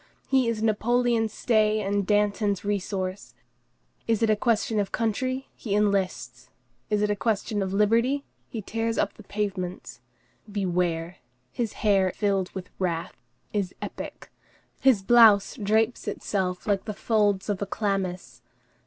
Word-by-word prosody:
He 265 Hz, -2 st, +3 dB
is 220 Hz, -1 st, -2 dB
Napoleon's 225 Hz, +1 st, +2 dB
stay 215 Hz, -1 st, +2 dB
and 200 Hz, -1 st, -1 dB
Danton's 205 Hz, -1 st, +1 dB
resource. 190 Hz, -, -3 dB, 0.7 s
Is 225 Hz, -1 st, +1 dB
it 220 Hz, -, +4 dB
a -, -, +4 dB
question 220 Hz, 0 st, +1 dB
of 200 Hz, -1 st, -1 dB
country, 255 Hz, +4 st, -1 dB
he 205 Hz, -4 st, -3 dB
enlists; 180 Hz, -12 st, -1 dB, 0.4 s
is 210 Hz, 0 st, +1 dB
it 210 Hz, -, +2 dB
a -, -, +1 dB
question 210 Hz, -1 st, -1 dB
of 190 Hz, -1 st, -2 dB
liberty, 230 Hz, +8 st, +2 dB, 0.2 s
he 220 Hz, -3 st, -5 dB
tears 225 Hz, +2 st, -2 dB
up -, -, +1 dB
the -, -, -14 dB
pavements. 190 Hz, -, -4 dB, 0.5 s
Beware! 175 Hz, -3 st, -1 dB, 0.3 s
his 230 Hz, -3 st, -2 dB
hair 195 Hz, -3 st, +4 dB
filled 195 Hz, -3 st, 0 dB
with 180 Hz, -1 st, -7 dB
wrath, 170 Hz, -3 st, -2 dB, 0.3 s
is 200 Hz, -3 st, -2 dB
epic; -, -, -7 dB, 0.5 s
his 255 Hz, -7 st, +4 dB
blouse 220 Hz, -2 st, +6 dB
drapes 220 Hz, +3 st, +1 dB
itself 185 Hz, -3 st, -2 dB
like 200 Hz, -2 st, 0 dB
the 215 Hz, -, -4 dB
folds 205 Hz, -4 st, +1 dB
of 205 Hz, -2 st, -2 dB
a 200 Hz, -, -1 dB
chlamys. 185 Hz, -, -3 dB
205 Hz, 140 wpm, -26 LUFS, 190-220 Hz, 0.7 s, blouse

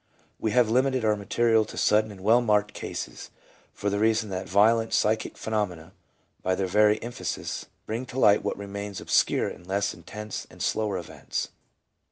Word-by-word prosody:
We 110 Hz, -, 0 dB
have 120 Hz, +1 st, +4 dB
limited 130 Hz, +1 st, +2 dB
our 105 Hz, -1 st, +3 dB
material 110 Hz, +2 st, +2 dB
to -, -, -10 dB
sudden 105 Hz, +1 st, +3 dB
and 95 Hz, -2 st, -12 dB
well 115 Hz, +4 st, +5 dB
marked 105 Hz, -3 st, +2 dB
cases, -, -, -6 dB, 0.4 s
for 100 Hz, -, -2 dB
the 100 Hz, -, 0 dB
reason 110 Hz, -1 st, +2 dB
that 95 Hz, 0 st, -4 dB
violent 110 Hz, +3 st, +4 dB
psychic 110 Hz, +1 st, 0 dB
phenomena, 95 Hz, -6 st, -3 dB, 0.5 s
by 95 Hz, 0 st, +1 dB
their 95 Hz, -, -1 dB
very 105 Hz, +3 st, +4 dB
emphasis, 120 Hz, +1 st, -4 dB, 0.2 s
bring 115 Hz, +4 st, -4 dB
to 125 Hz, -, -8 dB
light 105 Hz, -5 st, +5 dB
what -, -, -2 dB
remains 100 Hz, 0 st, -6 dB
obscure -, -, +2 dB
in -, -, -8 dB
less 100 Hz, +3 st, -1 dB
intense 105 Hz, +5 st, -7 dB
and -, -, -16 dB
slower 105 Hz, -3 st, 0 dB
events. 85 Hz, -, -5 dB
105 Hz, 170 wpm, -26 LUFS, 100-110 Hz, 0.5 s, well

